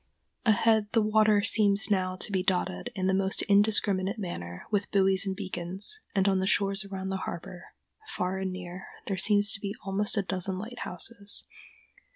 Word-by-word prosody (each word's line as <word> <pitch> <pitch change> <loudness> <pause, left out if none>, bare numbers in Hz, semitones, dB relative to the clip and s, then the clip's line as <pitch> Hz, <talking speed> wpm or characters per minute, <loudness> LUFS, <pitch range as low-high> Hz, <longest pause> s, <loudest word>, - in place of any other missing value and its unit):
Ahead 220 -1 +3
the 225 - +4
water 215 -1 +3
seems 210 -1 +4
now 185 -2 0
to 185 - -2
be 190 -2 +1
dotted 185 +5 -1
in 185 -2 -2
the 190 - +2
most 190 0 +1
indiscriminate 200 -1 +3
manner 90 - -6
with 205 -2 0
buoys 195 0 +3
and 190 - -2
beacons, 190 - -4 0.2
and 195 0 +2
on 190 -1 +2
the 190 - -1
shores 200 +1 +2
around 190 -1 -6
the 190 - -2
harbor, 175 0 -7 0.4
far 185 - -3
and 190 -1 -3
near, 185 0 -8 0.2
there 195 - -2
seem 205 +2 +4
to 205 0 +4
be 200 0 -5
almost 200 +2 -1
a 200 - +1
dozen 190 0 -2
lighthouses. 205 -1 -5
195 Hz, 175 wpm, -28 LUFS, 185-205 Hz, 0.4 s, the